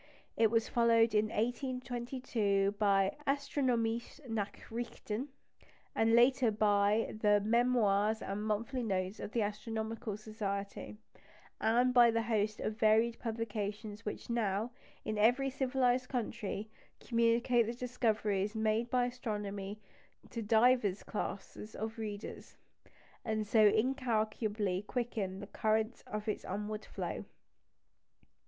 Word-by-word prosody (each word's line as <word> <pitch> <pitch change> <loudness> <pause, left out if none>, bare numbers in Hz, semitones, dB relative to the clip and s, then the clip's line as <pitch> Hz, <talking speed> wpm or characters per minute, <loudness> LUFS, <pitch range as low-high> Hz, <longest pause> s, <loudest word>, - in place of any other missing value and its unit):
It 225 -1 +4
was 225 0 +2
followed 230 -1 +4
in 210 0 +4
1822 240 -3 -1
by 195 -2 +3
the 275 - +2
Astronomische 250 -4 -1
Nachrichten, 225 +2 -4 0.7
later 240 +3 +4
by 210 0 +2
the 205 -1 +5
Memoirs 220 -2 +2
and 200 +2 -3
Monthly 220 +4 -1
Notices 190 -3 -2
of - - -6
the 230 - +2
Astronomical 220 0 -4
Society, 205 -1 -5 0.6
and 245 +3 +3
by 240 -1 +7
the 230 0 +1
host 215 -2 0
of 215 +1 -3
varied 225 +2 +3
publications 215 -2 -4
which 210 - -5
now, 225 -1 0 0.3
in 215 -1 -2
every 250 +5 +3
civilised 255 -1 +1
country, 220 -3 -3 0.3
communicate 235 0 +2
the 235 - -2
discoveries 220 -4 0
made 220 +1 +1
in 255 - +3
astronomy 210 -5 -3 0.5
to 230 - -4
divers 220 -2 +3
classes 210 0 -5
of 220 +1 -5
readers, 210 -1 -6 0.7
and 215 -1 -1
so 215 0 +5
incalculably 215 -4 0
quicken 210 -4 -3
the - - -6
current 220 +2 0
of 210 +1 -5
its 215 - -2
onward 210 +2 -4
flow. - - -4
220 Hz, 115 wpm, -33 LUFS, 210-240 Hz, 0.7 s, by